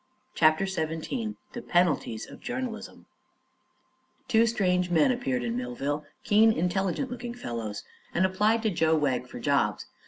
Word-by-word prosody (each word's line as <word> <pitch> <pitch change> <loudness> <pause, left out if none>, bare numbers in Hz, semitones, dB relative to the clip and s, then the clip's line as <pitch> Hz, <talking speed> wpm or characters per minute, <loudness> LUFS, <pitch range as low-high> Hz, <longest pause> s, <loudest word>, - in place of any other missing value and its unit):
CHAPTER 155 +4 +4
XVII 190 +6 -3 0.2
THE 240 - -5
PENALTIES 175 - +1
OF - - -12
JOURNALISM 245 -3 -5 1.2
Two 230 -2 +4
strange 180 -5 +1
men 165 +4 +4
appeared 130 - -1
in 115 -1 -2
Millville 135 +5 -3 0.2
keen, 220 +2 +5
intelligent 190 +6 -1
looking 240 -1 -5
fellows 115 - -5 0.3
and 185 - +2
applied 210 +4 +2
to 220 - +2
Joe 160 -2 +2
Wegg 130 -4 0
for - - -9
jobs. - - +1
180 Hz, 135 wpm, -28 LUFS, 150-225 Hz, 1.2 s, keen